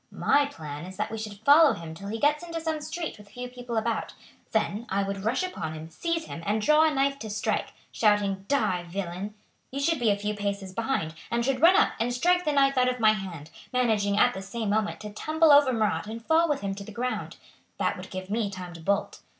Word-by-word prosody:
"My 285 Hz, -1 st, +2 dB
plan 150 Hz, -, -8 dB
is 185 Hz, 0 st, -10 dB
that -, -, -2 dB
we 225 Hz, -, -4 dB
should 215 Hz, -1 st, -8 dB
follow 295 Hz, +1 st, +7 dB
him 165 Hz, -1 st, -7 dB
till 195 Hz, +5 st, -9 dB
he 220 Hz, +2 st, -3 dB
gets 295 Hz, +6 st, +2 dB
into 335 Hz, -1 st, -4 dB
some 320 Hz, -1 st, -2 dB
street 320 Hz, -5 st, -5 dB
with 205 Hz, 0 st, -15 dB
few 245 Hz, +4 st, -6 dB
people 245 Hz, -2 st, -6 dB
about. 225 Hz, +1 st, -1 dB, 0.4 s
Then 220 Hz, +1 st, -1 dB
I 200 Hz, +1 st, +1 dB
would 195 Hz, 0 st, -4 dB
rush 245 Hz, +10 st, +1 dB
upon 165 Hz, -, -4 dB
him, 160 Hz, +1 st, -9 dB
seize 330 Hz, -, -2 dB
him, 165 Hz, -, -7 dB
and 210 Hz, +4 st, 0 dB
draw 305 Hz, +8 st, +5 dB
a 315 Hz, -, +3 dB
knife 275 Hz, 0 st, +1 dB
to 220 Hz, -, -6 dB
strike, 215 Hz, +1 st, -1 dB, 0.2 s
shouting, 205 Hz, -3 st, +1 dB
'Die, 185 Hz, -11 st, +1 dB
villain!' 190 Hz, +2 st, -4 dB, 0.3 s
You 275 Hz, -, -4 dB
should 320 Hz, +2 st, +1 dB
be 235 Hz, -2 st, +2 dB
a 200 Hz, -, +2 dB
few 210 Hz, +1 st, -2 dB
paces 200 Hz, -2 st, -3 dB
behind, 225 Hz, -7 st, -1 dB, 0.2 s
and 235 Hz, 0 st, 0 dB
should 265 Hz, -1 st, 0 dB
run 345 Hz, +3 st, +7 dB
up -, -, +4 dB
and 235 Hz, +2 st, 0 dB
strike 355 Hz, +8 st, +2 dB
the 300 Hz, -, +2 dB
knife 275 Hz, -1 st, +3 dB
out 250 Hz, 0 st, +4 dB
of 250 Hz, 0 st, -3 dB
my 215 Hz, -1 st, +6 dB
hand, 170 Hz, -7 st, -7 dB, 0.2 s
managing 220 Hz, -5 st, +1 dB
at 245 Hz, +3 st, +5 dB
the 190 Hz, -, -6 dB
same 215 Hz, +1 st, -3 dB
moment 215 Hz, 0 st, 0 dB
to 210 Hz, -1 st, -7 dB
tumble 310 Hz, +8 st, +3 dB
over 285 Hz, -2 st, +7 dB
Marat 215 Hz, -3 st, 0 dB
and 225 Hz, +1 st, -7 dB
fall 325 Hz, +1 st, +3 dB
with 290 Hz, -2 st, 0 dB
him 195 Hz, -1 st, -2 dB
to 200 Hz, +1 st, -7 dB
the 215 Hz, -, -10 dB
ground. 250 Hz, +4 st, -3 dB, 0.4 s
That -, -, 0 dB
would -, -, -9 dB
give 185 Hz, 0 st, -6 dB
me 220 Hz, -1 st, 0 dB
time 180 Hz, -3 st, -7 dB
to 165 Hz, -, -10 dB
bolt. 200 Hz, +4 st, -1 dB
220 Hz, 240 wpm, -27 LUFS, 200-275 Hz, 0.4 s, follow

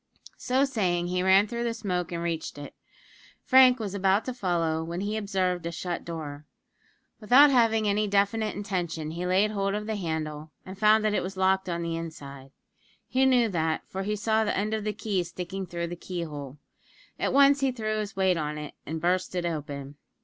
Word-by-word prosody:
So 260 Hz, +2 st, +2 dB
saying, 180 Hz, -9 st, 0 dB
he 180 Hz, 0 st, 0 dB
ran 190 Hz, +2 st, +5 dB
through 235 Hz, +2 st, -4 dB
the 235 Hz, -1 st, -1 dB
smoke 180 Hz, -6 st, -2 dB
and 170 Hz, -1 st, -3 dB
reached 165 Hz, -3 st, -3 dB
it. 145 Hz, 0 st, -8 dB, 0.7 s
Frank 255 Hz, -1 st, +6 dB
was 205 Hz, -4 st, -4 dB
about 195 Hz, +1 st, +2 dB
to 255 Hz, -, -3 dB
follow, 170 Hz, -7 st, -1 dB
when 170 Hz, +2 st, -4 dB
he 205 Hz, +2 st, -2 dB
observed 190 Hz, -4 st, -1 dB
a -, -, -3 dB
shut 175 Hz, +1 st, -4 dB
door. 150 Hz, -3 st, -7 dB, 0.7 s
Without 255 Hz, +6 st, +6 dB
having 225 Hz, -4 st, +3 dB
any 210 Hz, +1 st, +1 dB
definite 205 Hz, +2 st, +1 dB
intention, 175 Hz, -6 st, -3 dB
he 175 Hz, +2 st, -4 dB
laid 195 Hz, +4 st, +3 dB
hold 195 Hz, -1 st, -1 dB
of 210 Hz, 0 st, -3 dB
the 220 Hz, 0 st, -2 dB
handle, 160 Hz, -3 st, -4 dB, 0.2 s
and 190 Hz, -, -8 dB
found 215 Hz, 0 st, +5 dB
that 215 Hz, -, +2 dB
it -, -, +1 dB
was 190 Hz, +1 st, -6 dB
locked 190 Hz, 0 st, +2 dB
on 170 Hz, 0 st, -2 dB
the 165 Hz, 0 st, -2 dB
inside 140 Hz, -5 st, -8 dB, 0.6 s
he 265 Hz, +1 st, +2 dB
knew 250 Hz, -3 st, +4 dB
that, 160 Hz, -4 st, -1 dB
for 190 Hz, -, -5 dB
he 210 Hz, +2 st, -1 dB
saw 220 Hz, +1 st, +1 dB
the 210 Hz, -, -1 dB
end 210 Hz, +2 st, -1 dB
of 215 Hz, -1 st, -2 dB
the 215 Hz, -, 0 dB
key 210 Hz, -4 st, -1 dB
sticking 180 Hz, +2 st, -6 dB
through 170 Hz, -1 st, -3 dB
the 175 Hz, +1 st, -5 dB
key 175 Hz, 0 st, -5 dB
hole. 145 Hz, -3 st, -7 dB, 0.6 s
At -, -, 0 dB
once 280 Hz, 0 st, +5 dB
he 270 Hz, -1 st, +1 dB
threw 215 Hz, -3 st, -2 dB
his 210 Hz, -2 st, -5 dB
weight 190 Hz, -2 st, +2 dB
on 150 Hz, -1 st, -3 dB
it, 150 Hz, -1 st, -7 dB
and 160 Hz, +1 st, -3 dB
burst 180 Hz, +2 st, 0 dB
it 175 Hz, -1 st, -1 dB
open. 145 Hz, -3 st, -5 dB
190 Hz, 205 wpm, -27 LUFS, 170-215 Hz, 0.7 s, Frank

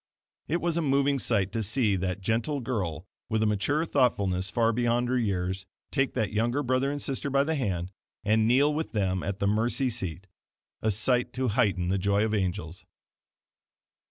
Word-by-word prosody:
It 170 Hz, +3 st, 0 dB
was 170 Hz, -1 st, 0 dB
a -, -, +2 dB
moving 140 Hz, -1 st, +2 dB
sight 100 Hz, -6 st, +1 dB
to 115 Hz, -, -2 dB
see 110 Hz, 0 st, +2 dB
that 95 Hz, +1 st, -2 dB
gentle 115 Hz, +8 st, 0 dB
girl, 95 Hz, -, -3 dB, 0.2 s
with 110 Hz, -1 st, +1 dB
a -, -, +3 dB
mature 110 Hz, +10 st, +1 dB
thoughtfulness 100 Hz, -, +1 dB
far 115 Hz, +3 st, +2 dB
beyond 120 Hz, +1 st, +1 dB
her 130 Hz, -, +1 dB
years, 95 Hz, -3 st, -2 dB, 0.2 s
take 135 Hz, -2 st, 0 dB
that 110 Hz, -6 st, -1 dB
younger 120 Hz, +6 st, +1 dB
brother 130 Hz, +1 st, +1 dB
and 145 Hz, 0 st, -3 dB
sister 140 Hz, +1 st, -2 dB
by 140 Hz, 0 st, +3 dB
the 160 Hz, +3 st, -1 dB
hand, 95 Hz, -, -2 dB, 0.3 s
and 110 Hz, +1 st, +3 dB
kneel 140 Hz, +5 st, +4 dB
with 155 Hz, +2 st, -3 dB
them 95 Hz, -3 st, 0 dB
at 100 Hz, -1 st, -3 dB
the 100 Hz, -, -1 dB
mercy 115 Hz, +5 st, +1 dB
seat 95 Hz, -5 st, -4 dB, 0.6 s
a 110 Hz, -, +1 dB
sight 120 Hz, +4 st, +1 dB
to 130 Hz, -1 st, 0 dB
heighten 100 Hz, -6 st, +1 dB
the 95 Hz, +1 st, +1 dB
joy 100 Hz, +2 st, +2 dB
of 110 Hz, -, -2 dB
angels. 90 Hz, -4 st, -2 dB
110 Hz, 185 wpm, -28 LUFS, 95-130 Hz, 0.6 s, kneel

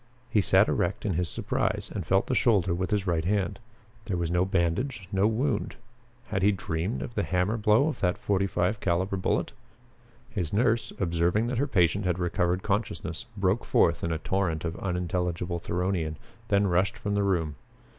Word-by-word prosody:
He 105 Hz, -, +4 dB
sat 95 Hz, +2 st, +4 dB
erect 95 Hz, +6 st, -1 dB
in 100 Hz, -, +1 dB
his 85 Hz, 0 st, -1 dB
surprise -, -, -1 dB
and 95 Hz, -6 st, -4 dB
felt 95 Hz, +1 st, +3 dB
the -, -, -2 dB
shoulder 100 Hz, -8 st, +3 dB
with 90 Hz, +1 st, -2 dB
his 105 Hz, -2 st, 0 dB
right 85 Hz, -3 st, 0 dB
hand. 100 Hz, +2 st, 0 dB, 0.5 s
There 95 Hz, -4 st, -2 dB
was 85 Hz, -1 st, -1 dB
no 90 Hz, +1 st, +2 dB
bandage, 95 Hz, +5 st, -1 dB
no 100 Hz, +1 st, +3 dB
wound. 115 Hz, 0 st, -1 dB, 0.5 s
Had 95 Hz, -2 st, -1 dB
he 100 Hz, +2 st, +5 dB
dreamed 90 Hz, +1 st, -2 dB
of -, -, -7 dB
the 105 Hz, -, 0 dB
hammer 90 Hz, +3 st, 0 dB
blow 110 Hz, +5 st, +3 dB
of 155 Hz, -, -3 dB
that 90 Hz, +1 st, +1 dB
forty 100 Hz, -1 st, 0 dB
five 95 Hz, +3 st, 0 dB
caliber 95 Hz, +2 st, 0 dB
bullet? 95 Hz, -, 0 dB, 0.8 s
His 85 Hz, -4 st, -3 dB
nurse, 115 Hz, +2 st, +2 dB
observing 85 Hz, +4 st, +1 dB
that 125 Hz, -1 st, -1 dB
her 140 Hz, -, +1 dB
patient 95 Hz, -, +2 dB
had 90 Hz, -1 st, +1 dB
recovered 90 Hz, +1 st, 0 dB
consciousness, 100 Hz, 0 st, -2 dB
broke 100 Hz, +3 st, +1 dB
forth -, -, +2 dB
in 85 Hz, -, -1 dB
a 80 Hz, -, 0 dB
torrent 85 Hz, -1 st, -1 dB
of 85 Hz, 0 st, -3 dB
unintelligible 90 Hz, -1 st, -2 dB
Theronian, 90 Hz, -2 st, -1 dB, 0.3 s
then 100 Hz, 0 st, +3 dB
rushed 95 Hz, +5 st, +1 dB
from 100 Hz, -, -3 dB
the 100 Hz, -, +2 dB
room. 85 Hz, -6 st, 0 dB
95 Hz, 185 wpm, -27 LUFS, 85-105 Hz, 0.8 s, he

